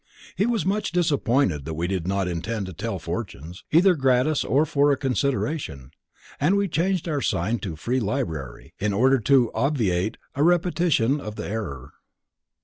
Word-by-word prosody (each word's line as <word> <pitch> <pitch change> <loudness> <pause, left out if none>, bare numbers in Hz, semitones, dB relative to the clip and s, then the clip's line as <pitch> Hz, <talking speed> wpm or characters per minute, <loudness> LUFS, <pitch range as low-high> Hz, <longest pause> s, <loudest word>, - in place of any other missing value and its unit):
He 205 - +1
was 230 -8 0
much 205 +3 0
disappointed 140 - +1
that 80 0 -4
we 85 +2 -2
did 90 -2 -2
not 95 -1 0
intend 95 +5 -3
to 95 - -7
tell - - -4
fortunes, 85 +6 -6
either 180 +4 +6
gratis 135 0 +2
or 145 +4 +2
for 145 -1 +3
a 140 - +2
consideration, 135 - -2 0.5
and 175 +8 +3
we 200 0 +1
changed 180 +2 0
our 150 -4 -1
sign 110 +2 0
to 90 -6 -5
"Free 120 +11 -1
Library" 100 - -4
in 105 0 0
order 130 +6 +4
to 125 0 +3
obviate 110 -9 0 0.2
a 140 - -2
repetition 165 -6 +2
of 105 -3 -7
the - - -5
error. 70 - -5
130 Hz, 165 wpm, -24 LUFS, 95-155 Hz, 0.5 s, either